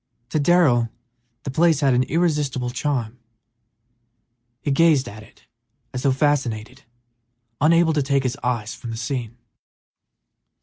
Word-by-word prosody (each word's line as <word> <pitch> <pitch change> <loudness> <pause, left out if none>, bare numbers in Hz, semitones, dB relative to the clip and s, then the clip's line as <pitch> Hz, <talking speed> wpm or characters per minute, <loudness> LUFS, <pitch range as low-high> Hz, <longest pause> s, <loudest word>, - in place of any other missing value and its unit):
To 155 - 0
Darrell 140 -8 +3 0.5
the 135 - -4
place 160 +1 +3
had 135 -2 +3
an 125 - +3
irresistible 145 -4 0
charm; 125 -4 -3 1.4
he 145 - 0
gazed 150 -2 +3
at 110 +1 -9
it 110 - -19 0.5
as 125 - -3
though 135 - +2
fascinated, 130 -3 -1 0.8
unable 165 +1 +4
to 150 - +1
take 140 0 +1
his 130 0 -1
eyes 120 -4 -2
from 120 - -9
the 115 - -5
scene. 120 -1 -4
135 Hz, 130 wpm, -22 LUFS, 120-150 Hz, 1.4 s, unable